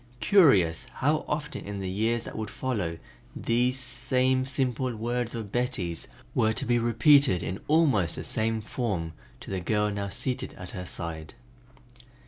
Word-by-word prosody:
Curious 105 - +4
how 150 +4 +1
often 150 0 -3
in 100 0 -5
the 95 - -3
years 110 +5 0
that - - -8
would 110 0 -4
follow, 100 -11 -2 0.4
these 125 +2 +1
same 130 0 +1
simple 130 -2 -1
words 120 +2 -2
of 110 -4 -5
Betty's 110 -9 -2 0.3
were 110 0 +2
to - - -1
be 120 0 +2
repeated 120 - +4
in 95 +3 -4
almost 140 - +3
the - - -5
same 110 0 -1
form 100 -8 -3 0.3
to - - -8
the 95 - -1
girl 105 +4 +1
now 100 0 -3
seated 130 +5 -3
at 90 -1 -8
her 90 - -6
side! 80 -3 -5
115 Hz, 155 wpm, -27 LUFS, 95-130 Hz, 0.4 s, Curious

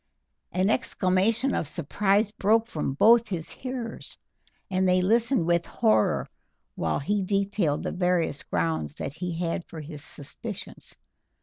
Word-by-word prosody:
An 185 +4 +2
exclamation 220 +3 +1
of 160 - -1
surprise 195 +7 +1
broke 220 +2 +2
from 150 - -3
both 230 +7 +6
his 170 -6 -4
hearers, 250 -3 -6 0.5
and 185 -1 +1
they 180 0 +4
listened 225 +1 +2
with 170 0 +1
horror 110 0 +2 0.5
while 80 -2 -1
he 205 +8 0
detailed 195 -5 0
the - - -2
various 180 -4 0
grounds 80 -3 -2
that 135 - -5
he 170 +1 -4
had 170 0 -2
for 160 - -9
his 150 -1 -7
suspicions. 145 -3 -6
185 Hz, 135 wpm, -26 LUFS, 155-210 Hz, 0.5 s, both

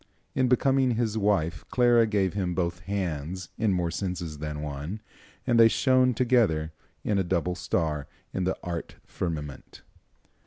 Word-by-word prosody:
In 130 -1 +2
becoming 130 0 +3
his 110 -2 0
wife 95 -8 +1
Clara 120 -2 +4
gave 100 -4 +1
him 90 -3 -1
both 85 -1 -1
hands 90 -3 -3
in 110 -2 +2
more 90 -2 0
senses 85 -4 -4
than 75 0 -4
one, 75 +7 -5 0.5
and 120 -2 +3
they 115 - +9
shone 130 +1 +3
together 110 -11 +2 0.3
as 105 -2 +2
a - - +2
double 90 0 0
star 80 -5 -1 0.3
in 95 - -1
the 95 +1 0
art 85 -2 -5
firmament. 75 -5 -5
95 Hz, 150 wpm, -27 LUFS, 80-115 Hz, 0.5 s, they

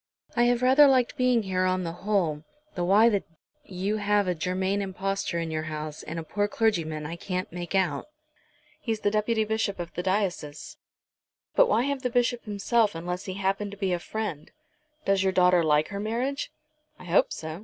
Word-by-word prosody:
I 240 - +4
have 245 0 +2
rather 265 +3 +7
liked 255 -3 +3
being 250 -3 +2
here 185 -1 0
on 185 0 +1
the 165 - -3
whole, 175 -5 -1 0.3
though 175 - -2
why 205 +5 +6
the 205 -4 +3
d - - -22 0.4
you 195 +3 -2
should - - -5
have 205 -1 +2
a 180 - +2
Germain 185 +4 -1
impostor 195 -1 -2
in 165 -1 -2
your 155 0 -2
house, 155 0 -5
and 160 - -6
a 165 - -3
poor 205 +5 -1
clergyman, 165 -9 0
I 165 +3 -5
can't 185 +1 -4
make 175 +2 -5
out." 175 -7 0 0.7
"He's 225 -3 -3
the 205 - +1
Deputy 220 +1 +1
Bishop 215 -3 -1
of 170 -1 -6
the 175 - -3
diocese." 190 - -2 0.8
"But - - +5
why 240 - +3
have 280 0 -2
the 250 - -1
Bishop 245 0 0
himself 210 0 +1
unless 180 +2 -4
he 185 - -5
happen 195 +1 -1
to 200 - -10
be 190 -2 0
a 175 - 0
friend? 195 -6 -5 0.6
Does 195 -1 +3
your 190 -1 +1
daughter 180 -1 +5
like 150 -1 +2
her 200 - -5
marriage?" 245 +7 -2 0.5
"I - - -13
hope 175 +2 +3
so. 160 +1 -6
195 Hz, 200 wpm, -27 LUFS, 175-220 Hz, 0.8 s, rather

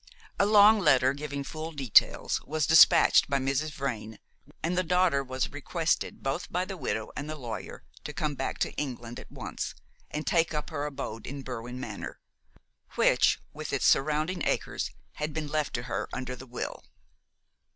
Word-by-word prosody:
A 200 - +4
long 210 +1 +7
letter, 135 -7 +4
giving 145 -1 -5
full 155 +3 -6
details, 135 -7 +3
was 155 0 0
despatched 160 -1 +7
by 140 - +2
Mrs. 135 +3 0
Vrain, 115 -7 -4 0.5
and 170 +3 0
the 185 - +3
daughter 180 -5 +2
was 130 -1 -3
requested, 160 +3 -1
both 150 +8 -2
by 180 +1 0
the 195 - -6
widow 110 - -3
and 145 - -5
the 155 - -3
lawyer, 120 -6 -7 0.2
to - - -4
come 150 -1 -2
back 135 -1 -3
to - - -7
England 120 -4 -4
at - - -13
once - - -5 0.3
and 150 +1 -4
take 165 -2 +2
up 150 - -3
her 145 -1 -2
abode 135 -6 -6
in 140 +1 -6
Berwin 125 0 -6
Manor, - - -6 0.8
which, - - +4
with - - -6
its - - 0
surrounding 155 +5 +2
acres, - - -1 0.3
had 150 0 -3
been 155 -2 -3
left 150 -3 -1
to 125 - -3
her 125 - -3
under 130 0 -4
the 130 +1 -11
will. 125 - -5
145 Hz, 170 wpm, -28 LUFS, 130-160 Hz, 0.8 s, long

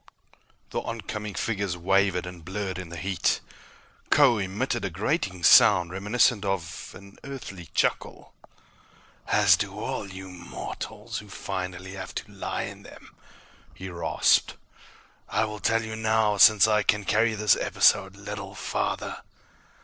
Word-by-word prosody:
The - - -1
oncoming 105 -3 -5
figures 100 -5 -2
wavered 95 0 +1
and 90 -2 -9
blurred 95 +1 -4
in 90 -2 -8
the 85 - -8
heat. 95 +1 0 0.7
Kho 120 -3 +5
emitted 110 +5 -2
a 95 - -1
grating 95 - -2
sound 85 0 +7
reminiscent 105 +3 +2
of 95 -5 -4
an 100 0 -16
Earthly 110 - -8
chuckle. - - -1 0.9
"As - - +5
do - - -4
all 100 - -4
you 95 0 -9
mortals 90 -1 -7
who 105 - -13
finally 95 -1 -5
have 95 -1 -8
to 105 - -6
lie 100 - -4
in - - -8
them," - - -15 0.6
he 95 0 -7
rasped. 85 -1 +2 0.7
"I 105 - +1
will 105 0 -6
tell 115 +1 +1
you 110 0 -5
now, 110 -1 +1
since 105 0 +7
I 105 -1 +3
can 105 0 +1
carry 110 +3 +2
this 105 0 +4
episode - - +2
little - - -7
farther. - - -3
100 Hz, 140 wpm, -26 LUFS, 95-105 Hz, 0.9 s, sound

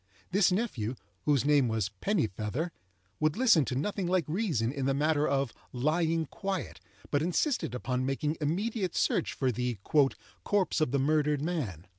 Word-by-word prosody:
This 195 0 +4
nephew, 135 - -1 0.3
whose 145 -3 +3
name 145 -3 +4
was 110 -3 -1
Pennifeather, 140 - -1 0.5
would 155 +2 +1
listen 225 - +5
to 125 - -3
nothing 185 +6 -1
like 180 -3 +2
reason 155 - 0
in 135 -1 -2
the 135 - +2
matter 150 +1 +2
of 135 -3 0 0.2
"lying 160 +5 +1
quiet," 190 +3 -4 0.3
but 145 - +2
insisted 180 - 0
upon 125 +1 -2
making 145 +4 -1
immediate 190 +5 -1
search - - +1
for 130 -2 0
the 125 0 -2 0.7
"corpse 195 -5 +1
of 155 - +2
the 140 - +1
murdered 150 +1 +2
man." 125 - -3
150 Hz, 155 wpm, -30 LUFS, 130-175 Hz, 0.7 s, listen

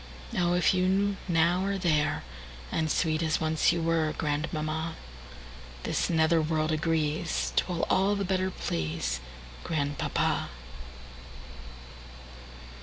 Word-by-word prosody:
Oh, 175 0 +2
if 180 +2 +3
you 190 +2 +2
now 170 +1 +3
are 200 0 0
there, 155 -5 +1 0.5
And 160 -1 0
sweet 155 0 +1
as 160 -1 +1
once 160 +1 +2
you 170 -1 -1
were, 165 -2 +1
Grandmamma, 155 +1 -2 0.9
This - - 0
nether 160 0 +3
world 155 0 0
agrees'T 160 0 0
will 175 -2 -2
all 195 +2 +2
the 200 -1 -1
better 185 0 0
pleaseGrandpapa. 65 - -2
160 Hz, 105 wpm, -28 LUFS, 155-175 Hz, 0.9 s, if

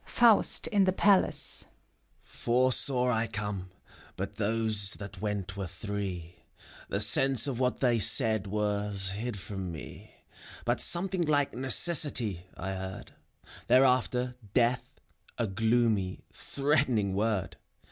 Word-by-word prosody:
FAUST 235 -3 +3
(in 200 -3 +1
the 185 - +2
Palace). 195 0 +2 0.6
Four 125 +2 0
saw 125 -1 +5
I 115 -1 0
come, 100 -3 -5 0.5
but - - -6
those 110 -1 +1
that 100 -2 -10
went 100 -3 -4
were 100 -2 -5
three; 90 -3 -6 0.5
The - - -2
sense 135 -2 +3
of 130 -3 -4
what 125 -1 -1
they 120 -3 +2
said 110 -2 +2
was 105 -1 -2
hid 110 +2 -5
from 95 -2 -7
me, 80 - -11 0.5
But - - 0
something 185 +1 +3
like 145 -3 +1
"Necessity^* 130 - +1
I 95 +2 -5
heard; 95 0 -7 0.6
Thereafter, 125 -1 +2
" 100 - -22
Death, 125 0 +1
*^ - - -27 0.4
a 115 - -1
gloomy, 110 -2 0
threatening 135 -8 -1
word 105 -1 -2
110 Hz, 125 wpm, -28 LUFS, 100-130 Hz, 0.6 s, saw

